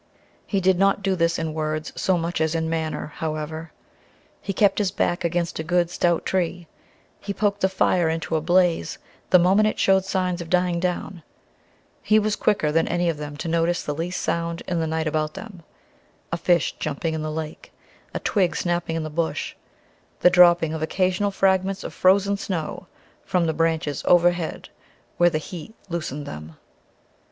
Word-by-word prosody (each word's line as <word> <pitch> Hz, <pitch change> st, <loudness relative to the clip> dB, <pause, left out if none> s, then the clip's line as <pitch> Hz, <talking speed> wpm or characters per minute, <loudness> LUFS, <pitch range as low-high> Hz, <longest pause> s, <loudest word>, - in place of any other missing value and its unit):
He 200 Hz, -, 0 dB
did 185 Hz, -1 st, +2 dB
not 195 Hz, 0 st, +3 dB
do 190 Hz, -1 st, +1 dB
this 170 Hz, -1 st, +1 dB
in 160 Hz, -1 st, -3 dB
words 155 Hz, 0 st, -3 dB
so 190 Hz, -2 st, +1 dB
much 170 Hz, 0 st, -2 dB
as 160 Hz, +1 st, +1 dB
in 160 Hz, 0 st, 0 dB
manner, 155 Hz, -2 st, -3 dB
however. 155 Hz, 0 st, -4 dB, 0.7 s
He 200 Hz, -, -3 dB
kept 195 Hz, +1 st, +3 dB
his 205 Hz, -3 st, +1 dB
back 175 Hz, 0 st, -1 dB
against 170 Hz, -1 st, -1 dB
a -, -, -2 dB
good, 175 Hz, +1 st, +1 dB
stout 175 Hz, -2 st, +1 dB
tree; 175 Hz, -1 st, -1 dB, 0.5 s
he 200 Hz, 0 st, -5 dB
poked 205 Hz, -1 st, 0 dB
the 190 Hz, -, +3 dB
fire 180 Hz, -3 st, +2 dB
into 165 Hz, 0 st, -2 dB
a 155 Hz, -, +1 dB
blaze 175 Hz, -, +2 dB, 0.3 s
the -, -, +7 dB
moment 190 Hz, +5 st, +4 dB
it 215 Hz, -, -1 dB
showed 190 Hz, -1 st, +3 dB
signs 185 Hz, -2 st, -1 dB
of 165 Hz, -, -8 dB
dying 180 Hz, -1 st, +2 dB
down; 180 Hz, 0 st, -3 dB, 0.8 s
he 215 Hz, -, +3 dB
was 215 Hz, -1 st, +1 dB
quicker 195 Hz, -8 st, +1 dB
than 165 Hz, +1 st, +2 dB
any 175 Hz, 0 st, +1 dB
of 165 Hz, -, -2 dB
them 145 Hz, -1 st, -7 dB
to 165 Hz, -, -5 dB
notice 170 Hz, +1 st, +1 dB
the 150 Hz, -, -3 dB
least 170 Hz, +4 st, -3 dB
sound 170 Hz, 0 st, -2 dB
in 175 Hz, -2 st, -1 dB
the 160 Hz, -, -1 dB
night 160 Hz, 0 st, -1 dB
about 155 Hz, +1 st, -1 dB
them 195 Hz, -3 st, -9 dB, 0.7 s
a 165 Hz, -, 0 dB
fish 175 Hz, -3 st, +2 dB
jumping 155 Hz, +2 st, -2 dB
in 160 Hz, -, -3 dB
the 155 Hz, 0 st, -3 dB
lake, 155 Hz, 0 st, -6 dB, 0.4 s
a -, -, -3 dB
twig 190 Hz, -5 st, +1 dB
snapping 175 Hz, -2 st, -1 dB
in 165 Hz, -, -2 dB
the 155 Hz, -, -5 dB
bush, 165 Hz, +1 st, -2 dB, 0.7 s
the 180 Hz, -, +6 dB
dropping 175 Hz, -3 st, +5 dB
of 160 Hz, -, -4 dB
occasional 185 Hz, +4 st, +1 dB
fragments 195 Hz, 0 st, +1 dB
of -, -, -6 dB
frozen 200 Hz, +2 st, +3 dB
snow 180 Hz, -2 st, -4 dB, 0.4 s
from 180 Hz, -3 st, +1 dB
the 160 Hz, -, 0 dB
branches 160 Hz, -2 st, 0 dB
overhead 175 Hz, -1 st, +2 dB, 0.5 s
where 175 Hz, 0 st, +5 dB
the 155 Hz, -, -1 dB
heat 175 Hz, +7 st, -8 dB
loosened 155 Hz, -4 st, -4 dB
them. 75 Hz, -, -8 dB
170 Hz, 180 wpm, -23 LUFS, 160-185 Hz, 0.8 s, the